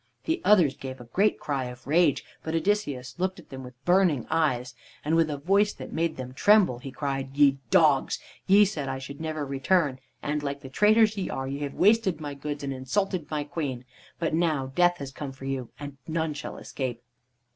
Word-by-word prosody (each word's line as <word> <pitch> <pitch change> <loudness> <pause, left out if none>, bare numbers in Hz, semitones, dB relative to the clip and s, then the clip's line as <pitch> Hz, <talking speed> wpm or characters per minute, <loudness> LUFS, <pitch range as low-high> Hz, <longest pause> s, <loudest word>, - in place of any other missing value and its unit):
The 330 +2 -1
others 180 -10 +5
gave 130 -1 -7
a - - -9
great 205 +3 +2
cry 140 -3 -2
of 125 +1 -9
rage, 155 0 +3 0.2
but 160 +1 -3
Odysseus 155 - -1
looked 185 +1 -1
at - - -14
them 130 -1 -7
with 125 0 -11
burning 175 - +3
eyes, 130 -6 +1 0.3
and 155 +2 +2
with 165 -1 +3
a 145 - -2
voice 200 +8 +2
that - - -9
made 165 0 -1
them 130 -1 -6
tremble 195 - +4
he 135 - -7
cried: 135 0 -4
"Ye 140 -2 +5
dogs! - - +4 0.3
ye 205 +2 +7
said 150 -9 -3
I 135 - -2
should 140 +3 -8
never 155 -2 -3
return, 140 0 +1 0.2
and, 150 +1 -1
like 140 -1 -4
the 135 - -9
traitors 215 +7 +4
ye 190 - -2
are, 135 0 -3
ye 140 +1 -4
have 145 -1 -4
wasted 200 -4 +3
my 145 -2 -5
goods 145 +1 -5
and 135 -1 -2
insulted 165 +6 -2
my 150 -1 -1
queen. 145 -5 -4 0.3
But 165 -2 -1
now 155 -5 +1
death 175 +2 +3
has 140 -3 -6
come 135 -1 -6
for 135 0 -10
you, 135 -3 -3
and 145 -1 -7
none 160 -1 -1
shall 145 - -7
escape." 120 -3 -5
145 Hz, 205 wpm, -27 LUFS, 135-175 Hz, 0.3 s, ye